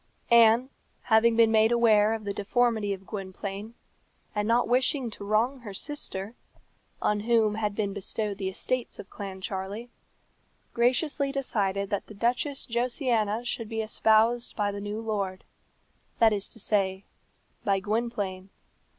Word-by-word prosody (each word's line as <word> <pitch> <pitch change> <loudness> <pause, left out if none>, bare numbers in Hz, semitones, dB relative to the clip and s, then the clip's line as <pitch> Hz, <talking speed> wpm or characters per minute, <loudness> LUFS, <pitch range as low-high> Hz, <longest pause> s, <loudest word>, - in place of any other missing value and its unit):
Anne, 235 +3 +6 0.3
having 225 0 +4
been 225 -1 +5
made 220 +1 +4
aware 220 -2 +4
of 220 - -7
the 200 -1 -3
deformity 220 0 +1
of 195 -1 -5
Gwynplaine, 200 +2 -6 0.6
and 210 0 -1
not 235 +2 +3
wishing 250 0 +1
to 205 - -9
wrong 225 +6 +1
her 210 -5 -8
sister, 220 -7 -2 0.7
on 210 0 +2
whom 220 -1 +2
had 210 -1 -2
been 200 -2 -1
bestowed 205 +1 -3
the 190 -1 -1
estates 250 +6 -2
of 200 - -11
Clancharlie, 195 +3 -6 0.8
graciously 275 +4 +1
decided 200 -7 -1
that 200 - -2
the 215 - -11
Duchess 255 +6 -1
Josiana 235 -2 0
should 230 -2 -3
be 225 -1 -2
espoused 220 +2 +2
by 205 -1 0
the 200 0 -6
new 205 +1 -4
lord 200 -4 -3 0.7
that 225 -2 +5
is 200 -1 -1
to - - -9
say, 195 -3 +1 0.6
by 195 -1 +2
Gwynplaine. 205 -3 -3
220 Hz, 140 wpm, -27 LUFS, 200-235 Hz, 0.8 s, Anne